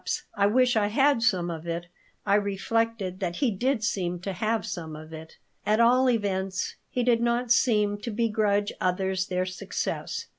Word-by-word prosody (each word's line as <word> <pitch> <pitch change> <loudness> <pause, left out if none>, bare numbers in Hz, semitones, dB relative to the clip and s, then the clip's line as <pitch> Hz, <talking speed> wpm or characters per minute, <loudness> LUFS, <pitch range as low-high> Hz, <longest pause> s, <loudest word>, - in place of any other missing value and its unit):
I 200 0 +3
wish 250 +3 +3
I 210 -2 +3
had 270 +3 +3
some 185 -7 +1
of 165 0 -7
it." 170 +1 -3 0.4
I 200 - +2
reflected 205 -1 0
that 175 -3 -2
he 250 +4 +1
did 240 +4 0
seem 180 -5 -1
to 195 +1 -4
have 215 +2 -1
some 160 -3 -5
of 155 +1 -11
"it." 160 0 -10 0.3
At 215 +1 +2
all 250 +2 +5
events, 195 -5 -1
he 250 - -1
did 235 -1 +3
not 235 0 0
seem 210 -4 +3
to 235 - -5
begrudge 210 -2 +1
others 185 +1 0
their 185 0 -1
success. 185 0 -4
205 Hz, 175 wpm, -27 LUFS, 185-230 Hz, 0.4 s, all